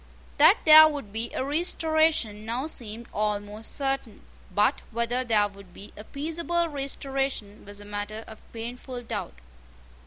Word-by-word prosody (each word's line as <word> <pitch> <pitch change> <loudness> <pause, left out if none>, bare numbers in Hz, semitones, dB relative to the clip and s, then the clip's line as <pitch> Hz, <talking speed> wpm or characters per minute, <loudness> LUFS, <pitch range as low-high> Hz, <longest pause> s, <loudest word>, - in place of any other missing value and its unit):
That - - +7
there 315 0 +11
would 280 -10 -5
be 225 +2 -3
a 260 - -2
restoration 315 -7 +1
now 235 +5 -3
seemed 235 -6 -5
almost 210 +1 -2
certain; 270 -5 -2 0.3
but 210 +8 +2
whether 235 +2 -1
there 215 -4 +3
would 195 -2 -16
be 205 - -11
a 210 - -9
peaceable 330 +6 -2
restoration 270 -6 -3
was 205 0 -7
matter 205 +1 -5
of 220 - -12
painful 245 +2 -7
doubt. 145 - -5
235 Hz, 135 wpm, -26 LUFS, 210-280 Hz, 0.3 s, there